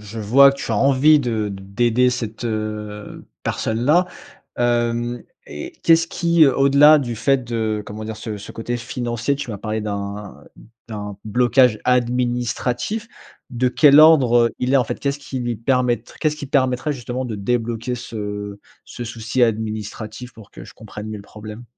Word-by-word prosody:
je 110 +2 -9
vois 135 +6 +6
que 140 - -10
tu - - -3
as - - +1
envie 140 +5 +5
de 115 -5 -2
d'aider 115 +6 +1
cette, 115 -2 -5
heu, 105 -2 -5 0.2
personne-là. 145 +11 +1 0.5
Hem, 120 0 0 0.2
et 75 - -8
qu'est 165 -1 +6
ce 165 0 -1
qui, 170 -3 +3
au 135 +1 +3
delà 150 +2 +7
du 120 -5 -4
fait 130 +3 +1
de, 110 -3 -2
comment 110 +1 -7
dire, 110 0 -6
ce 110 -3 -5
ce 100 - -10
côté 120 +2 -4
financier, 120 +2 -3
tu 140 -4 -6
m'as 105 - -4
parler 110 +1 -3
d'un 100 -1 -6 0.4
d'un 105 -2 -6
blocage 120 +1 +3
administratif. 125 - -1 0.4
De 125 +1 0
quel 145 +2 +6
ordre 125 -7 +5
il 125 +2 0
est, - - +7
en 125 - +3
fait? - - -5
Qu'est-ce 140 0 -2
qui 135 -2 -6
lui 120 -2 -3
permettr 120 -1 -1
qu'est-ce 150 -1 0
qui 145 - -7
permettrait 130 +1 0
justement 125 -1 -5
de 110 -4 -5
débloquer 115 +3 -2
ce 105 -4 -6 0.3
ce 120 - -8
souci 115 +2 -2
administratif? 110 +1 -3
Pour 110 -3 -15
que - - -12
je - - -14
comprenne 110 0 -9
mieux 110 - -5
le 100 - -10
problème. 110 +3 -10
120 Hz, 170 wpm, -20 LUFS, 110-130 Hz, 0.5 s, delà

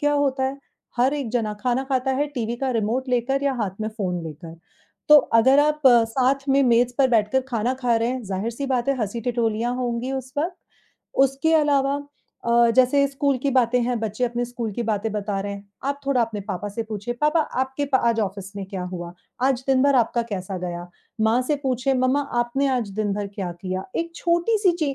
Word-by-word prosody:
क्या 290 -1 +2
होता 275 -2 +1
है, 265 +1 -2 0.4
हर 260 +4 +3
एक 275 -6 -3
जना 220 -3 -1
खाना 250 +1 0
खाता 265 -1 0
है 295 - +2
टीवी 235 -2 -2
का 265 +1 -1
रिमोट 235 +3 -1
लेकर 250 +3 0
या 280 - +2
हाथ 195 0 -5
में 215 - -1
फ़ोन 190 -6 -3
लेकर। 160 +1 -9 0.5
तो 300 - +10 0.2
अगर 265 +4 +5
आप 300 +1 +1 0.3
साथ 270 +1 +1
में 275 +1 +4
मेज़ 245 -1 +3
पर 270 -1 +5
बैठकर 225 +3 +3
खाना 240 0 0
खा 250 -3 +1
रहे 230 +1 0
हैं, 255 0 -3
ज़ाहिर-सी 220 +7 -3
बात 255 -1 0
है 275 - +2
हँसी-ठिठोलियाँ 230 +1 -1
लिया 250 - -4
होंगी 240 +2 -2
उस 260 -1 -5
वक़्त, 345 +4 -1 0.6
उसके 275 +4 +2
अलावा 285 -2 +2 0.4
अ, 235 0 +4
जैसे 270 +2 +5
स्कूल 275 0 0
की 280 - +1
बातें 250 -1 +3
हैं, 245 0 0
बच्चे 220 +2 -1
अपने 240 0 -1
स्कूल 240 -2 -4
की 240 - -3
बातें 220 +1 0
बता 205 -1 -2
रहे 200 +1 -4
हैं, 200 0 -10 0.2
आप 280 +1 -2
थोड़ा 275 -3 +2
अपने 225 -3 -1
पापा 200 0 -4
से 230 +3 -3
पूछिए, 220 +2 -5
"पापा 300 +2 +3 0.2
आपके 265 +2 -1
पा 260 - +5
आज 230 -1 +1
ऑफ़िस 195 -1 -4
में 195 - -4
क्या 190 -1 -5
हुआ? 175 -1 -6 0.3
आज 260 -1 +2
दिन 265 -1 +3
भर 280 0 +4
आपका 235 0 +2
कैसा 190 -1 -4
गया?" 175 -1 -5 0.4
माँ 225 +3 +3
से 290 +3 0
पूछें, 260 0 0
"मम्मा 255 +2 +2 0.2
आपने 240 +4 0
आज 250 -5 0
दिन 210 -2 0
भर 205 0 -3
क्या 195 -2 -5
किया?" 185 +2 -5
एक 335 0 -3
छोटी-सी 360 +3 +2
ची 285 -3 0
245 Hz, 210 wpm, -23 LUFS, 215-270 Hz, 0.6 s, तो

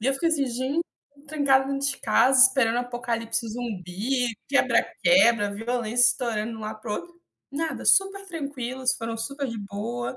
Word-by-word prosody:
E 235 - -2
eu 270 - +2
fiquei, 335 +4 0
assim: 290 -4 +1
“Gente, 260 +6 -2 0.3
fiquei 285 0 -24
trancada 280 -3 +2
dentro 275 0 0
de 270 - -3
casa 260 0 +4
esperando 260 -3 +4
apocalipse 235 -2 -3
zumbi, 230 +2 -3 0.2
quebra-quebra, 235 - +3
violência 240 +2 0
estourando 230 -2 -3
lá 215 0 -4
para 215 0 -7
o - - 0
outro”. 345 0 -10 0.3
Nada. 315 +3 -4
Super 390 0 +3
tranquilos. 265 -6 -3
Foram 230 -1 -5
super 275 +5 -4
de 230 -2 -5
boa. 215 +5 -5
245 Hz, 160 wpm, -25 LUFS, 230-275 Hz, 0.3 s, casa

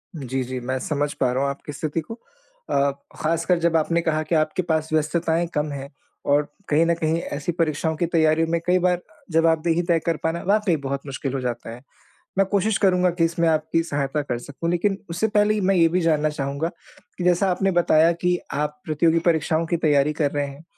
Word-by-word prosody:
जी, 135 -3 -3
जी। 130 +1 -5
मैं 130 +2 -2
समझ 145 0 -1
पा 125 -1 0
रहा 130 +2 0
हूँ 140 - +1
आपकी 140 +2 -6
स्थिति 155 +3 -3
को 160 - -8 0.6
अ, 140 0 +2 0.2
ख़ासकर 165 +3 +1
जब 170 0 +1
आपने 165 +2 +1
कहा 155 -2 0
कि 160 +2 -1
आपके 155 +3 +1
पास 160 -2 -1
व्यस्तताएँ 165 +2 +1
कम 150 0 -1
हैं। 140 -1 -6 0.4
और 145 +1 +5 0.3
कहीं 155 +3 +4
न 170 - +3
कहीं 160 0 0 0.2
ऐसी 150 +4 -2
परीक्षाओं 160 -1 -1
की 170 - +1
तैयारियों 160 -1 +2
में 170 - +1
कई 180 +1 +3
बार 180 0 +1 0.3
जवाबदेही 165 +1 +2
तय 165 -1 +4
कर 165 -2 +1
पाना 165 +1 -1
वाक़ई 205 -3 +3
बहुत 140 0 -4
मुश्किल 135 -1 -4
हो 135 - -1
जाता 120 -2 -4
है। 125 - -14 0.6
मैं 195 - +4
कोशिश 200 +2 +1
करूँगा 180 -2 +3
कि 170 -1 0
इसमें 165 0 +1
आपकी 160 +1 +1
सहायता 145 -2 -2
कर 120 -4 -3
सकूँ। 145 +6 -4
लेकिन 195 +3 +1
उससे 175 +6 0
पहले 210 0 +2
मैं 195 +1 +2
ये 165 -2 +5
भी 180 +3 0
जानना 155 -3 +2
चाहूँगा 140 +2 -2 0.5
कि 180 - -2
जैसा 180 +2 +3
आपने 190 +2 +1
बताया 165 0 +4
कि 180 0 +2
आप 150 +1 -2
प्रतियोगी 160 +2 +2
परीक्षाओं 160 0 +1
की 170 - 0
तैयारी 150 -2 +2
कर 145 -2 +2
रहे 145 -1 -1
हैं। 140 +3 -11
160 Hz, 210 wpm, -23 LUFS, 145-170 Hz, 0.6 s, और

